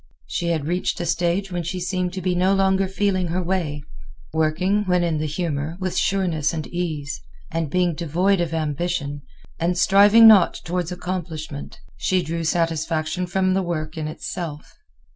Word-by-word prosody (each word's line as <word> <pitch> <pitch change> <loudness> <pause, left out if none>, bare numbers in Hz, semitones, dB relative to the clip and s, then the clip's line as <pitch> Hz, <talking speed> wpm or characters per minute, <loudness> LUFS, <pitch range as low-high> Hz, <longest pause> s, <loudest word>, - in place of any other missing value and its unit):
She 170 - -3
had 160 -4 0
reached 175 +3 -1
a 175 - -2
stage 175 +3 0
when 175 -1 -2
she 170 +3 -4
seemed 180 0 -1
to 185 -1 -5
be 185 0 +1
no 185 +2 +3
longer 195 0 +2
feeling 190 -1 0
her 180 +2 -1
way, 165 -5 -2 0.5
working, 170 +6 +1
when 180 -1 +2
in 165 -3 0
the 155 - -1
humor, 155 0 -3
with 185 -1 -2
sureness 175 -6 +1
and 155 -2 -3
ease. 155 -5 -4 0.3
And 165 -2 -1
being 180 +2 +1
devoid 175 +4 +1
of 170 -2 -1
ambition, 150 -2 -2 0.4
and 175 +2 0
striving 205 +5 +7
not 205 -5 +7
toward 175 0 -2
accomplishment, 165 -5 -5 0.2
she 185 -1 +1
drew 165 +2 -3
satisfaction 165 +1 0
from 185 +1 +1
the 190 - +2
work 160 -3 -3
in 155 -1 -3
itself. 155 0 -6
175 Hz, 165 wpm, -23 LUFS, 160-185 Hz, 0.5 s, striving